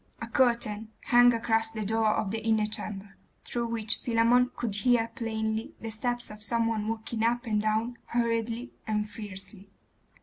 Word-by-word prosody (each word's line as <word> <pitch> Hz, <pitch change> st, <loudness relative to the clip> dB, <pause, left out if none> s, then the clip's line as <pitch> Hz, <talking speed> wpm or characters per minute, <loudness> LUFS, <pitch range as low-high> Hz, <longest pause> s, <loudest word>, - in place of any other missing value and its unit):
A -, -, -4 dB
curtain 230 Hz, -4 st, +1 dB, 0.2 s
hung 245 Hz, 0 st, +7 dB
across 225 Hz, -1 st, +1 dB
the 220 Hz, -2 st, -4 dB
door 220 Hz, +1 st, +2 dB
of 195 Hz, -, -1 dB
the 220 Hz, 0 st, -3 dB
inner 220 Hz, -1 st, +2 dB
chamber, 205 Hz, -2 st, -5 dB, 0.3 s
through 235 Hz, -1 st, -1 dB
which 225 Hz, -2 st, +2 dB
Philammon 240 Hz, +1 st, +3 dB
could 215 Hz, -4 st, -2 dB
hear 235 Hz, 0 st, +3 dB
plainly 220 Hz, -1 st, -3 dB
the 225 Hz, -, -5 dB
steps 240 Hz, +2 st, -2 dB
of 210 Hz, 0 st, -10 dB
some 230 Hz, +1 st, +1 dB
one 220 Hz, -2 st, -1 dB
walking 225 Hz, 0 st, -3 dB
up 240 Hz, +2 st, +1 dB
and 210 Hz, -2 st, +1 dB
down 220 Hz, +3 st, 0 dB
hurriedly 235 Hz, +1 st, -1 dB
and 210 Hz, -1 st, 0 dB
fiercely. 200 Hz, -1 st, -9 dB
225 Hz, 165 wpm, -28 LUFS, 215-235 Hz, 0.3 s, hung